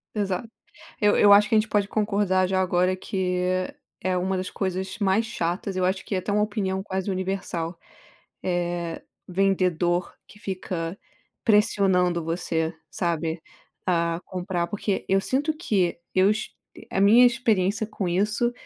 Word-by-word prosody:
Exato. 205 +1 -2 0.5
Eu 205 0 +4
eu 205 -1 +7
acho 210 +2 +6
que 225 - +3
a - - +6
gente 215 - -1
pode 205 -2 +1
concordar 200 -3 +1
já 190 0 +1
agora, 185 0 +2
que 185 -1 -2 0.6
é 185 0 -1
uma 190 +1 0
das 185 0 -3
coisas 190 +1 -3
mais 200 +3 +2
chatas, 185 -2 -3
eu 185 - 0
acho 190 +1 -1
que - - -4
é - - +1
até 205 - -4
uma 210 +1 +3
opinião 195 -3 -2
quase 190 0 -3
universal, 185 -3 -3 0.7
eh, 175 -2 -2 0.3
vendedor 180 -2 +1
que 210 - -17
fica 185 -3 -4 0.5
pressionando 190 -5 +3
você, 165 -1 -1 0.2
sabe, 165 +1 -2 0.5
a 170 -2 +1
comprar, 180 -2 -2
porque 205 0 -2
eu 195 0 +4
sinto 285 +8 0
que 200 - 0 0.2
eu 190 +1 +4
est 215 +1 -1 0.4
a - - 0
minha 220 +5 +7
experiência 220 -4 +2
com 210 -3 -4
isso 210 +6 +1
190 Hz, 150 wpm, -25 LUFS, 180-205 Hz, 0.7 s, eu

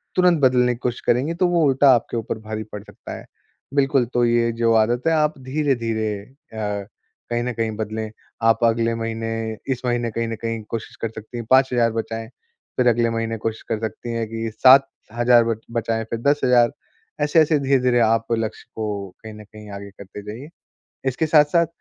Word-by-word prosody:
तुरंत 180 -4 +4
बदलने 125 -1 +4
की - - -16
कोशिश 120 - -3
करेंगी, 130 +7 +2
तो 180 +2 +2
वो 175 -2 +2
उल्टा 135 0 +5
आपके 120 0 -2
ऊपर 110 0 -4
भारी 110 0 -3
पड़ 105 - -5
सकता - - -9
है। - - -13 0.5
बिल्कुल, 135 -2 +3
तो 120 0 +3
ये 115 0 +2
जो 115 0 +4
आदत 120 +2 -2
है, 165 - +4
आप 155 -1 +1
धीरे-धीरे 115 -7 0
अ, 105 -5 -6 0.5
कहीं 120 0 0
न 125 0 -2
कहीं 115 -1 -1
बदलें। 110 0 -3 0.3
आप 115 +1 +3
अगले 115 0 0
महीने 115 -1 -3 0.2
इस 125 - -9
महीने 120 -1 0
कहीं 115 +1 -2
न 115 - -3
कहीं 115 -1 -3
कोशिश 115 -2 -5
कर 115 - -1
सकती 110 +2 -9
हैं, 115 - -5
5000 125 -3 +4
बचाएँ। 115 0 -7 0.5
फिर 125 - +3
अगले 120 0 +3
महीने 115 0 -2
कोशिश 110 0 -4
कर 110 - -1
सकती 110 +2 -5
हैं 115 -1 -2
कि 115 0 -3
7000 120 -1 +4
बच 115 -1 -1
बचाएँ, 115 -1 -1
फिर 115 - -3
10,000 125 -3 +3 0.5
ऐसे-ऐसे, 155 +1 +4
धीरे-धीरे, 130 -3 +2
आप 115 0 +3
लक्ष्य 115 -1 -2
को 105 -3 -3
कहीं 110 0 -8
न 105 - -11
कहीं 105 0 -13
आगे 100 0 -8
करते 100 +1 -10
जाइए। 110 +7 -8 0.6
इसके 130 +5 -1
साथ-साथ 155 +2 +4
115 Hz, 185 wpm, -22 LUFS, 110-130 Hz, 0.6 s, उल्टा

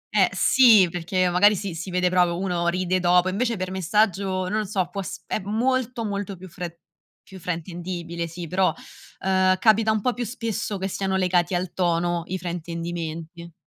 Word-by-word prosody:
Eh - - +5
sì 230 -8 +6
perché 180 +2 0
magari 205 +4 +5
si 195 -2 -4
si 165 +4 -6
vede 180 0 +1
proprio 180 -2 +2
uno 180 -2 -1
ride 185 +1 +1
dopo, 180 +1 +3
invece 230 +4 -1
per 185 0 -4
messaggio, 190 0 0
non 210 +3 0
lo 215 - -2
so, 190 -3 -1
può 195 - -3
s 190 - -7
è - - -2
molto, 235 +3 -1
molto 200 -2 -4
più 185 +2 -11
fre 170 -1 -8 0.4
più 190 - -12
fraintendibile, 170 0 -4
sì 170 +1 -7
però, 185 +3 +2 0.5
ehm, 185 0 +3
capita 220 +2 +4
un 215 -1 0
po' 250 +4 +1
più 245 - -4
spesso 225 -3 -3
che 190 0 -2
siano 190 0 -2
legati 180 -1 +1
al 175 0 -2
tono, 175 -1 0
i 185 - -3
fraintendimenti. 170 -1 -5
185 Hz, 180 wpm, -24 LUFS, 175-200 Hz, 0.5 s, sì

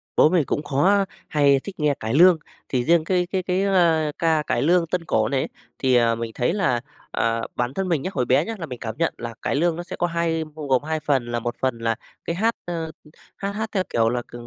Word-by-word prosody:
Bố 155 - +6
mình 165 -6 +2
cũng 150 - -2
khó 195 +9 +3 0.2
hay 140 -2 +4
thích 195 +6 -9
nghe 150 -1 +2
cải 110 +2 -3
lương, 175 +2 +7 0.3
thì 125 -2 0
riêng 165 0 +4
cái 180 0 +1
cái 190 -2 0
cái, 185 +1 0
ơ, 165 -6 +3
ca 160 -2 +2
cải 120 - +1
lương 170 +2 +3
tân 170 0 -2
cổ 110 -5 +1
này 135 -1 +1
ấy, - - -2 0.3
thì, 130 -2 +3
ờ, 115 -1 +4
mình 115 0 -4
thấy 125 +8 +1
là, 145 - +1 0.3
ờ, 115 0 0
bản 125 +2 -1
thân 190 +2 -2
mình 155 -5 +1
nhá, 185 - -3
hồi 125 -2 0
bé 135 +6 +3
nhá, 225 - -4
là 165 - -4
mình 125 -4 -8
cảm 110 -1 -5
nhận 165 - +1
là 120 -1 -6
cải - - -1
lương 165 +2 +2
nó 175 - -5
sẽ - - -7
có 175 - 0
hai 165 -1 0
bao 150 -2 -6
gồm 130 +1 +2
2 160 0 -2
phần, 135 -5 +1
là 120 - 0
1 120 +1 -3
phần 130 -3 0
là 115 -1 0 0.3
cái 170 - -2
hát, 225 +5 +1
ơ, 165 -2 -4 0.5
hát 200 0 -3
hát 220 +2 -3
theo 190 -3 +1
kiểu 115 -1 +2
là 120 0 -1
c - - -22
155 Hz, 260 wpm, -23 LUFS, 125-175 Hz, 0.5 s, lương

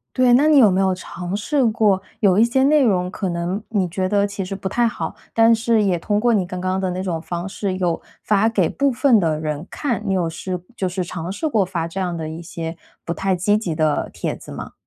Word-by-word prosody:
对， 255 -1 +4
那 280 +5 +5
你 300 -3 +6
有 220 - +7
没 190 0 +1
有 190 -1 +2
尝 180 +1 -6
试 265 +5 +1
过 210 -4 +2 0.2
有 195 -3 +4
一 225 - +6
些 265 +3 +1
内 295 0 +4
容 180 -5 +2
可 190 -1 -3
能 175 +5 -3
你 195 -5 0
觉 185 +1 -1
得 205 0 +2
其 200 -2 -5
实 195 +1 -5
不 190 0 -4
太 240 +2 +2
好， 235 - -4 0.2
但 225 0 +5
是 225 -1 +2
也 190 -4 +2
通 205 +5 0
过 235 0 +3
你 190 -3 +1
刚 180 0 -6
刚 185 +1 -1
的 185 -1 -1
那 185 +1 -3
种 175 -4 -2
方 175 +3 -5
式 195 -1 -3
有 175 -2 0 0.2
发 210 +1 +2
给 200 -7 +1
部 280 0 +1
分 250 -2 +4
的 160 -4 0
人 155 +1 -3
看。 240 -7 -2
你 195 - 0
有 175 -3 0
试 180 +2 -5 0.2
就 190 - 0
是 180 0 -2
尝 175 +1 -5
试 205 +11 -2
过 215 -10 +2
发 170 -3 -3
这 190 +3 -6
样 180 -2 -2
的 160 -1 -4
一 165 +2 -7
些 165 -1 -6 0.3
不 170 - -4
太 190 +1 0
积 205 +4 +2
极 180 -7 -3
的 155 -1 0
帖 - - -3
子 - - -12
吗？ - - -7
190 Hz, 270 characters per minute, -21 LUFS, 175-220 Hz, 0.3 s, 有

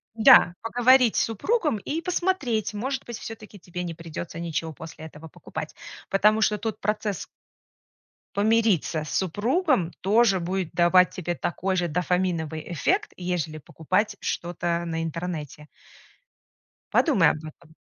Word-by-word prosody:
Да, 225 -6 +7
поговорить 245 +1 +4
с - - +3
супругом 300 - 0
и 300 +10 -4
посмотреть, 335 - -1
может 265 +5 -3
быть, 235 -2 -7
всё-таки 215 -2 -9
тебе 180 0 -6
не 170 -1 -4
придётся 165 0 -7
ничего 165 -1 -3
после 160 +1 -10
этого 160 0 -11
покупать, - - -8 0.3
потому 210 +3 +3
что 210 -1 +2
тут 220 +1 -4
процесс 210 -1 -2 1.1
помириться 205 -7 +2
с 155 - -8
супругом 210 - +1
тоже 205 0 +4
будет 180 0 -2
давать 180 +1 +5
тебе 175 -2 -3
такой 190 +3 -2
же 175 -1 0
дофаминовый 170 -2 -1
эффект, 385 - 0
ежели 175 -4 -3
покупать 185 - -1
что-то 170 0 -2
на 165 -1 -3
интернете. 160 -3 -5 1.3
Подумай 235 - +4
об - - -1
этом. 155 +1 -13
185 Hz, 130 wpm, -25 LUFS, 165-225 Hz, 1.3 s, Да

